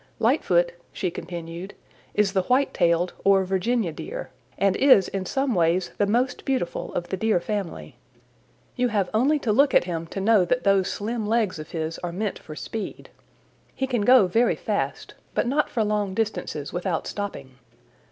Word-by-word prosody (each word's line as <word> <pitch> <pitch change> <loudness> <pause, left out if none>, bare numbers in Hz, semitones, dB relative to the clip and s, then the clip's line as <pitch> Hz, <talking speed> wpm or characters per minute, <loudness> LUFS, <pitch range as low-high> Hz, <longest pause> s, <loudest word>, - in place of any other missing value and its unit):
"Lightfoot," - - +2 0.2
she 180 - -2
continued, 170 +3 -7 0.4
"is 205 -2 +2
the 190 - +3
White 255 +8 +1
tailed 175 0 +2
or 195 -1 +4
Virginia 190 +1 0
Deer, - - -7 0.3
and 195 -1 +2
is 260 -9 +6
in 190 -1 -4
some 270 -2 0
ways 175 0 +1
the 205 - +3
most 245 +5 0
beautiful 260 -11 -2
of 175 - -3
the 190 - -2
Deer 220 -1 +2
family. 200 -1 -5 0.8
You 250 -1 +1
have 205 -5 0
only 265 +8 +3
to 245 -6 -1
look 275 +6 +4
at - - +6
him 165 -2 -4
to 195 - -5
know 205 0 +4
that 250 +7 0
those 195 -2 +3
slim 220 +1 -3
legs 215 -6 +1
of 155 - -8
his 160 -1 -4
are 175 - -4
meant 200 +3 -3
for 155 - -10
speed. 215 +5 -6 0.6
He 265 - -1
can 250 -4 -1
go 245 0 +6
very 225 +7 +2
fast, - - -3 0.2
but - - +2
not 285 +5 +1
for 225 - 0
long 210 -2 -1
distances 205 -9 -3
without 175 -2 -2
stopping. 140 -11 -6
200 Hz, 175 wpm, -25 LUFS, 175-235 Hz, 0.8 s, is